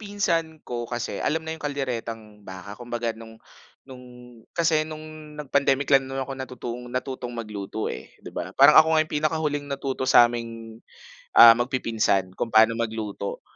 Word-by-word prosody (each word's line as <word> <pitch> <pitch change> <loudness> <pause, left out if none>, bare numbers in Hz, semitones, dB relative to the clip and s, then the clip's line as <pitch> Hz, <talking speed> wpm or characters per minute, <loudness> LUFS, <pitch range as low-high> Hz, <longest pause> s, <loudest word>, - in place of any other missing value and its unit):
pinsan 170 -7 -2
ko 120 -1 -5
kasi 120 -1 -4
alam 160 +1 -1
na 160 - -4
yung 160 - -9
kalderetang 115 -7 -5
baka, 95 0 -10
kumbaga 120 +1 -4
nung 115 0 -13 0.5
nung, 130 -2 -12 0.5
kasi 160 -2 +2
nung 155 -1 -10
nag-pandemic 140 -1 0
lang 135 -1 +4
naman 135 0 -3
ako 135 - -7
natutong 125 -2 -6
natutong 125 -1 -5
magluto, 105 -1 -5
eh, 65 - -10
'di - - -9
ba, - - -6
parang - - +8
ako 160 0 +2
nga 155 - +4
pinakahuling 150 -1 -2
natuto 135 -1 -3
saming, 115 -2 +2 0.5
ah, 115 - +11
magpipinsan 115 -6 0
kung 115 - -3
paano 110 +1 +5
magluto, 110 -3 -4
125 Hz, 150 wpm, -24 LUFS, 115-150 Hz, 0.5 s, ah